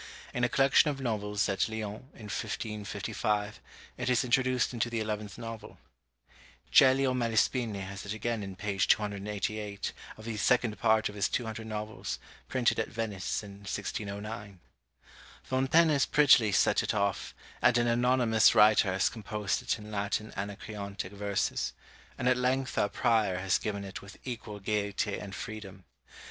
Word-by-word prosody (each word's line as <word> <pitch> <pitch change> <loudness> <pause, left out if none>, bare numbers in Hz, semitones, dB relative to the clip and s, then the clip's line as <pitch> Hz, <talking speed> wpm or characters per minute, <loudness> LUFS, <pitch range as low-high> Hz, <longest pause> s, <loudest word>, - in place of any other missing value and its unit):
In 125 - -1
a 120 - +3
collection 135 +4 +4
of 140 -2 -3
novels 105 -5 -1
at 100 +1 0
Lyons, 110 -1 -5
in 110 - -12
1555, 105 -1 -3 0.4
it - - -1
is 125 0 +3
introduced 130 0 +2
into 120 0 0
the 115 -1 -2
eleventh 105 -3 -4
novel. 115 -1 -8 0.9
Celio 130 0 +6
Malespini 115 -2 +1
has 100 +1 -6
it 105 - -6
again 115 +1 -2
in 95 -2 -6
page 100 0 -1
288 105 0 -1 0.2
of 110 - -11
the 115 -2 -4
second 120 0 +2
part 110 0 +3
of 105 - -7
his 100 -1 0
Two 120 - -1
Hundred 110 0 -6
Novels, 110 0 -4 0.3
printed 125 -3 +1
at 110 - 0
Venice 110 -2 -3
in 100 -1 -10
1609. 100 0 -5 0.8
Fontaine 135 +6 +3
has 140 -3 +3
prettily 125 -7 +5
set - - +3
it - - -1
off, 100 -1 -1 0.3
and 120 - +5
an 120 - +2
anonymous 120 -1 +4
writer 105 -2 +6
has 95 +1 +2
composed 105 -2 -2
it - - -1
in 105 0 -10
Latin 105 +1 -2
Anacreontic 100 -1 -5
verses; 100 -1 -1 0.4
and 125 - -1
at 125 0 +4
length 130 +1 0
our 100 - +2
Prior 110 -6 +2
has 95 0 +1
given 100 -2 -3
it 95 -1 -7
with 100 - -12
equal 115 -4 -6
gaiety 100 0 -1
and 100 -2 -7
freedom. 100 -4 -8
105 Hz, 155 wpm, -30 LUFS, 100-120 Hz, 0.9 s, Celio